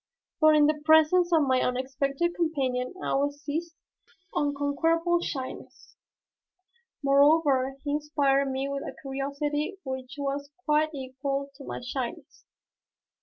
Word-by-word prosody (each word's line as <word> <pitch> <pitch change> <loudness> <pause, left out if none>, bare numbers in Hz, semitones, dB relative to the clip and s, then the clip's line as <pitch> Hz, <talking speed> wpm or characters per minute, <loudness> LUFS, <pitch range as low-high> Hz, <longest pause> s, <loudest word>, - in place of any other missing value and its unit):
But 310 -1 +6
in 300 -1 +6
the 300 0 +1
presence 315 +3 +5
of 320 -3 +5
my 260 -2 +2
unexpected 275 +6 -1
companion 270 -5 -1
I - - -1
was 285 +1 0
seized 320 +3 -4
with - - -36 0.2
an 290 - +1
unconquerable 330 +5 +1
shyness, 265 -6 -7 1.1
moreover 275 -1 +4
he 290 - -2
inspired 285 -2 +1
me 265 +1 -2
with 280 0 -3
a - - -7
curiosity 290 +5 -3
which 260 -1 -5
was 280 0 -3 0.2
quite 305 0 +2
equal 275 +1 -4
to 275 0 -12
my - - -5
shyness. 250 -1 -6
285 Hz, 130 wpm, -27 LUFS, 270-310 Hz, 1.1 s, But